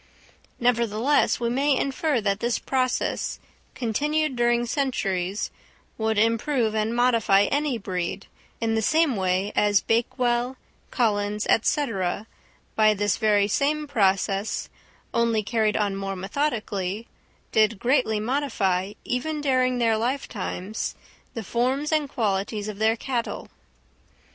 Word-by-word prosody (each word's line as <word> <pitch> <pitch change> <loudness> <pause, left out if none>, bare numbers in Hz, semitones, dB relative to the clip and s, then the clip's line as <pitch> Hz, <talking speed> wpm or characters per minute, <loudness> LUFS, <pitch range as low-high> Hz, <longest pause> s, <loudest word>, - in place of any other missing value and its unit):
Nevertheless 235 +2 +2
we 235 -1 0
may 275 +2 +2
infer 275 -1 0
that 200 -1 0
this 235 +1 0
process, 255 -2 -1 0.4
continued 295 +5 0
during 240 0 +2
centuries, 205 -8 -1 0.4
would 220 -1 -1
improve 230 +2 +2
and 220 +1 0
modify 230 -5 +4
any 285 +2 0
breed, 185 -2 -4 0.3
in 225 -1 0
the 220 - +1
same 310 +2 +3
way 190 +1 0
as 205 -1 +3
Bakewell, 240 +2 0 0.3
Collins, 210 -3 0 0.2
&c., 290 +5 +1 0.9
by 215 -1 +4
this 205 0 0
very 205 -2 +3
same 295 +7 0
process, 195 -5 0 0.4
only 230 -2 +2
carried 215 0 +1
on 205 -2 0
more 195 0 -3
methodically, 205 -2 -2 0.5
did 215 0 +3
greatly 235 -2 +1
modify, 210 -7 0
even 295 +5 -2
during 255 -3 +2
their 230 -2 +2
lifetimes, 220 -5 -3 0.4
the 225 - -4
forms 260 - 0
and 305 -3 +1
qualities 205 -2 -1
of 210 -1 -6
their 220 +1 +3
cattle. 240 0 -3
230 Hz, 120 wpm, -25 LUFS, 205-255 Hz, 0.9 s, modify